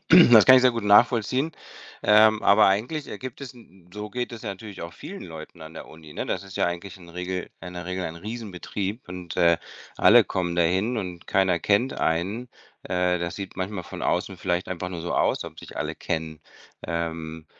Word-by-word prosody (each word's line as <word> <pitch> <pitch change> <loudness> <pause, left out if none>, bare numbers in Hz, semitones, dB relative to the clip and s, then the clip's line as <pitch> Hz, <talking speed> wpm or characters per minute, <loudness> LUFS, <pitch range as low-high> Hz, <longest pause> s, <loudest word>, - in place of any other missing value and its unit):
Das 125 - +8
kann 130 0 +10
ich 130 - +5
sehr 130 - +6
gut 115 -3 -4
nachvollziehen, 120 +7 +4 0.5
ähm, 110 +1 +5
aber 105 +2 +6
eigentlich 125 +10 -1
ergibt 125 +5 -7
es 135 -2 -7
hm, 95 -8 -19
so 105 0 -6
geht 125 0 -4
es 115 - -8
natürlich 100 -2 -7
auch 85 0 -7
vielen 195 - -9
Leuten 80 0 -10
an 80 +1 -11
der - - -9
Uni, 80 -1 -13
ne? - - -4
Das - - -2
ist 95 - -10
ja - - +2
eigentlich 85 +3 -5
in 85 -2 -15
Regel 90 +2 -5
in 90 0 -9
der 90 0 -6
Regel 90 0 -3
ein 80 - -5
Riesenbetrieb 105 +1 -5
und, 90 -1 -7
äh, 85 -1 +4 0.4
alle - - +7
kommen 85 -2 -2
dahin 95 +8 +1
und 90 -5 -5
keiner 95 -2 +2
kennt 105 +9 +1
einen. 95 +10 -1 0.4
Äh, 90 0 +1
das 85 0 -4
sieht 100 -2 -7
manchmal 95 -1 -4
von - - -8
außen 95 - -1
vielleicht 90 0 -2
einfach 90 0 -4
nur 90 -2 -6
so 85 - -3
aus, - - +1
ob - - -10
sich - - -11
alle - - -3
kennen, 80 -1 -4 0.5
ähm. 80 -1 -4
95 Hz, 200 wpm, -25 LUFS, 85-110 Hz, 0.5 s, kann